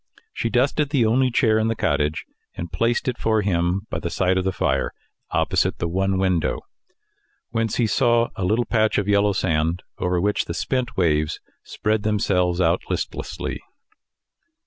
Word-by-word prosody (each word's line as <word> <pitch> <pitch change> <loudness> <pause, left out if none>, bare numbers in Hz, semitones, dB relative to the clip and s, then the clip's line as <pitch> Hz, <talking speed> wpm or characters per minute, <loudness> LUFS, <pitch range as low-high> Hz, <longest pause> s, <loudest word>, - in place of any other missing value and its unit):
She - - -2
dusted 135 +4 +1
the 135 -6 +2
only 130 +4 +3
chair 110 -2 +3
in 110 - +1
the 115 - 0
cottage, 75 -5 0 0.3
and 85 -1 -6
placed 115 +9 0
it 125 -2 -1
for 110 -1 +1
him 90 +1 0
by - - -2
the 85 - -3
side 95 +2 +1
of 95 - +1
the 95 - 0
fire, - - 0 0.4
opposite - - +1
the 85 - -2
one 95 +3 0
window, 95 -4 0 0.9
whence 115 -2 -1
he 120 - +2
saw 120 0 +2
a 95 - -3
little 110 +6 +1
patch 110 -2 +1
of 100 - 0
yellow 100 0 +3
sand 80 -1 0 0.2
over 90 0 0
which 105 +3 0
the - - -5
spent 130 -2 -2
waves 75 -4 +1 0.2
spread 110 0 -1
themselves 95 -4 +1
out 95 - +2
listlessly. - - -4
100 Hz, 170 wpm, -23 LUFS, 90-115 Hz, 0.9 s, only